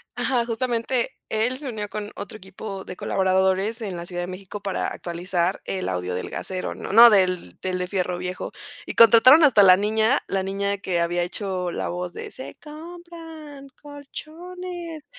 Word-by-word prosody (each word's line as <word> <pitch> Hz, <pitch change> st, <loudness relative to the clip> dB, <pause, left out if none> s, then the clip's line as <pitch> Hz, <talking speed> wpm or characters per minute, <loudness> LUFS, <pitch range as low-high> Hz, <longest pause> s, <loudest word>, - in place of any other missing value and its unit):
Ajá, 245 Hz, -3 st, 0 dB
justamente, 240 Hz, +1 st, -1 dB, 0.2 s
él 230 Hz, +4 st, 0 dB
se 280 Hz, -4 st, -5 dB
unió 210 Hz, -3 st, -4 dB
con 210 Hz, 0 st, -6 dB
otro 205 Hz, +1 st, -7 dB
equipo 195 Hz, 0 st, -8 dB
de 185 Hz, -, -9 dB
colaboradores 190 Hz, +4 st, +1 dB
en 195 Hz, -4 st, -4 dB
la 170 Hz, 0 st, -6 dB
Ciudad 175 Hz, 0 st, -4 dB
de -, -, -5 dB
México 195 Hz, +2 st, -8 dB
para 195 Hz, -1 st, -2 dB
actualizar 175 Hz, +1 st, -2 dB
el 190 Hz, -1 st, -3 dB
audio 90 Hz, 0 st, -2 dB
del 90 Hz, -, -4 dB
gasero. 185 Hz, -1 st, -4 dB
No -, -, -6 dB
no, 235 Hz, +3 st, +10 dB
del 185 Hz, -, +1 dB
del 185 Hz, -1 st, -2 dB
del 180 Hz, -, -2 dB
fierro 180 Hz, -2 st, -1 dB
viejo. 180 Hz, +1 st, -5 dB, 0.3 s
Y -, -, -6 dB
contrataron 255 Hz, +7 st, +8 dB
hasta 220 Hz, -8 st, +6 dB
la 185 Hz, -1 st, +8 dB
niña, 220 Hz, +5 st, +2 dB
la 190 Hz, -1 st, -1 dB
niña 200 Hz, +1 st, -1 dB
que 180 Hz, -3 st, -1 dB
había 175 Hz, +1 st, 0 dB
hecho 180 Hz, -1 st, -3 dB
la -, -, -3 dB
voz 180 Hz, 0 st, -4 dB
de -, -, -7 dB
se 260 Hz, -, -8 dB
compran 320 Hz, -2 st, -11 dB
colchones, 330 Hz, +3 st, -8 dB
205 Hz, 175 wpm, -24 LUFS, 185-260 Hz, 0.3 s, no